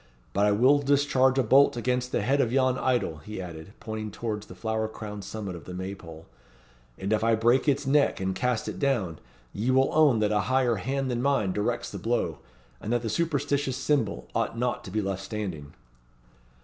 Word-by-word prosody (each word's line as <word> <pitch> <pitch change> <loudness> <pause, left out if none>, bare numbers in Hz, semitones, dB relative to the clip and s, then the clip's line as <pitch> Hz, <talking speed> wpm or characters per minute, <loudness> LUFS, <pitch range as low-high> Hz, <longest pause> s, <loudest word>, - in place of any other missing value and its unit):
"But 100 +1 +3
I - - +3
will 130 +8 +5
discharge 135 -2 +3
a 130 - +4
bolt 135 +2 +5
against 125 +1 -1
the 105 - 0
head 140 +5 +2
of 120 - 0
yon 130 -1 +3
idol," 120 -11 0
he 105 +8 -8
added, 85 +1 -8
pointing 110 -1 -5
towards 105 0 -4
the - - -11
flower 110 -1 -2
crowned 105 -2 -7
summit 100 -2 -5
of 80 - -10
the 90 - -7
May 95 +2 -4
pole; 80 -4 -11 0.7
"and 100 +3 -1
if 110 0 +1
I 115 0 +4
break 120 +6 +2
its 140 +1 0
neck 140 +1 +3
and 95 0 -1
cast 115 +4 -1
it - - -5
down, 110 - 0 0.3
ye 110 +5 -2
will 130 +1 +3
own 150 -6 +5
that 105 -1 +1
a 105 - +2
higher 130 -3 +2
hand 135 +5 -2
than 120 0 -1
mine 135 -8 +1
directs 115 +4 -2
the - - -6
blow, 120 +1 -1 0.4
and 110 - -4
that 120 0 +1
the 115 - -2
superstitious 145 -3 0
symbol 130 - 0
ought - - -1
not 125 +1 -1
to - - -7
be 105 +3 -1
left 95 -1 -3
standing." 95 -9 -5
115 Hz, 205 wpm, -27 LUFS, 100-130 Hz, 0.7 s, will